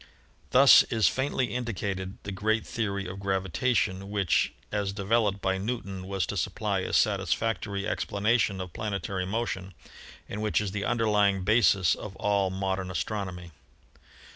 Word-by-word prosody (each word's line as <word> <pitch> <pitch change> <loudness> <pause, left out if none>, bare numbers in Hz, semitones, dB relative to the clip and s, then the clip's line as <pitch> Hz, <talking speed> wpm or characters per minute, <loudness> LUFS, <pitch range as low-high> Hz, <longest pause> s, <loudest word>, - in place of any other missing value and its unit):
Thus 135 +2 +8
is 110 -3 +3
faintly 130 -4 0
indicated 100 -6 -3
the 100 - -5
great 110 +3 0
theory 100 -4 -2
of 95 +2 -6
gravitation 95 +1 0
which, 100 -4 +1 0.2
as 100 -2 -1
developed 100 0 +1
by 95 0 +1
Newton, 100 -4 -4
was 95 -2 -1
to - - -4
supply - - -1
a - - -3
satisfac 115 0 +1
tory 100 -1 -4
explanation 105 -1 0
of 90 -2 -6
planetary 100 -3 -3
motion 95 -3 -3 0.5
and 105 - -5
which 105 -1 +1
is 105 -3 -2
the 100 +1 -3
underlying 105 -5 +2
basis 100 -4 +4
of 100 -3 -7
all 100 -3 +1
modern 95 0 -2
astronomy. 90 -2 -4
100 Hz, 140 wpm, -28 LUFS, 95-110 Hz, 0.5 s, Thus